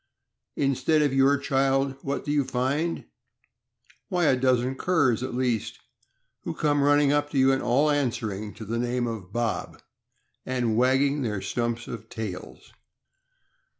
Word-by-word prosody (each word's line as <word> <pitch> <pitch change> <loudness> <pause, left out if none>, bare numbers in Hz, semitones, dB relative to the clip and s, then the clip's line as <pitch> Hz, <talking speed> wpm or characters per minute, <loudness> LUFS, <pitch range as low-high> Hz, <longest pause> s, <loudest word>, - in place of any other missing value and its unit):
Instead 140 +3 +2
of 145 -2 +1
your 135 +1 +4
child, 135 0 +1
what 140 0 -3
do 145 - -2
you 145 -1 +2
find? 135 +6 -1 1.0
Why, 180 -3 +1
a 135 - +4
dozen 130 0 +1
curs, 135 -6 +1
at 130 -1 -4
least, 125 -4 -1 0.6
who - - -5
come 145 -1 +1
run 145 +1 +4
ning 145 -1 +3
up 145 0 +1
to 145 - -4
you, 135 0 +5
all 145 +5 +2
answering 110 -7 -2
to 110 - -8
the 115 +3 -2
name 120 0 -1
of 110 -6 -6
Bob, 120 -1 -3 0.6
and 125 -3 -1
wagging 135 +4 +2
their 105 -5 -2
stumps 120 +3 -3
of 115 -1 -8
tails." 110 -7 -7
130 Hz, 150 wpm, -26 LUFS, 120-140 Hz, 1.0 s, you